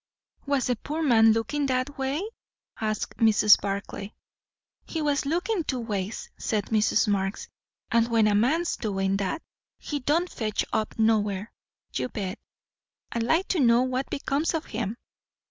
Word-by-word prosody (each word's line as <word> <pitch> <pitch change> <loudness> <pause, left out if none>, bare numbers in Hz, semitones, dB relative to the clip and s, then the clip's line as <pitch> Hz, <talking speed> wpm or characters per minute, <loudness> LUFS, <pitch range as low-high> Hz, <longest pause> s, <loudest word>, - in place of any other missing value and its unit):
"Was 280 -3 +1
the 250 - +1
poor 310 +7 -3
man 225 -5 +6
looking 250 +6 0
that 260 +2 -1
way?" 270 +6 -1 0.6
asked 215 -1 -2
Mrs. 215 -2 +6
Barclay. 200 +1 -4 0.7
"He 325 - -4
was 290 -2 0
lookin' 355 +5 0
two 260 -4 -2
ways," 210 -3 -4
said 210 -3 -1
Mrs. 215 +1 +3
Marx; 195 -1 -1 0.4
"and 230 0 +4
when 230 -2 +3
a 210 - +3
man's 295 +12 +2
doin' 195 -2 0
that, 200 - -2 0.3
he 290 - -4
don't 310 +7 +1
fetch 215 -10 -2
up 215 - -1
nowhere, 210 -2 +1 0.4
you - - -2
bet. 200 -2 -4 0.7
I'd 235 - -1
like 320 +11 +2
to 365 - +1
know 240 -2 +5
what 255 +1 -2
becomes 285 +4 -1
of 320 - -2
him! 225 0 -4
235 Hz, 150 wpm, -26 LUFS, 210-285 Hz, 0.7 s, man